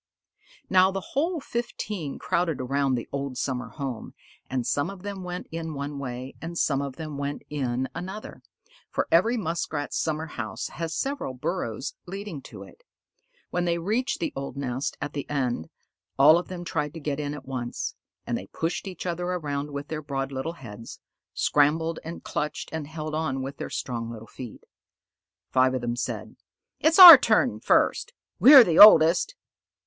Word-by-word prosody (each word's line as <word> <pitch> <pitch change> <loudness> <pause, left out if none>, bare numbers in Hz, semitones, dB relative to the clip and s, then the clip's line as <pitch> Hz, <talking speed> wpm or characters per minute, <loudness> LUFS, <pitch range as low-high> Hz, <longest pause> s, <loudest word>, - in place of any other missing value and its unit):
Now 185 0 +5
the 195 -1 -5
whole 330 +5 0
fifteen 210 - -4
crowded 170 -5 -1
around 135 +1 0
the 120 - -4
old 140 -2 -4
summer 125 -1 -3
home, 135 -6 -6 0.3
and 130 -2 -2
some 145 +5 0
of 195 -2 -10
them 200 -2 -6
went 180 0 -5
in 165 -1 -5
one 140 0 -5
way, 130 0 -6
and 170 +1 -6
some 140 -4 +1
of 140 -2 -5
them 155 -1 -6
went 145 0 -4
in 130 -3 -1
another, 190 +4 -7 0.5
for - - -1
every 225 +9 +4
Muskrat's 160 -6 -3
summer 160 0 -1
house 120 -8 -5
has 165 -1 -5
several 270 - -3
burrows 135 - -3
leading 195 -5 -6
to - - -11
it. - - -17 0.7
When 180 0 -1
they 170 -1 +1
reached 220 +10 -1
the 315 - -2
old 140 0 -6
nest 130 -1 -3
at 145 +1 -4
the 145 - -5
end, 125 - -2 0.5
all 155 +5 +7
of 180 - -7
them 175 -1 -7
tried 150 -2 -3
to - - -6
get 145 -1 -3
in 145 0 -3
at 140 -3 -10
once, 125 -3 -4 0.3
and - - -2
they - - -6
pushed 165 +4 -3
each 185 -2 -7
other 175 0 -2
around 150 -5 -3
with 140 0 -6
their 155 -1 -4
broad 135 -2 -4
little 135 +5 -4
heads, 115 -7 -10 0.4
scrambled 160 +3 +2
and 165 +1 -8
clutched 150 0 -4
and 160 -3 -4
held 155 0 -6
on 140 -4 -2
with 135 +1 -6
their - - -5
strong 115 -2 -4
little 115 -1 -9
feet. 120 0 -10 0.9
Five 130 0 +3
of 130 - -2
them 120 0 -2
said, 120 - -5 0.4
"It's 315 +1 +3
our 360 -3 +14
turn - - +2
first. 485 - +2 0.3
We're 270 -1 +10
the 170 -6 +1
oldest." 175 - +8
150 Hz, 175 wpm, -26 LUFS, 135-175 Hz, 0.9 s, our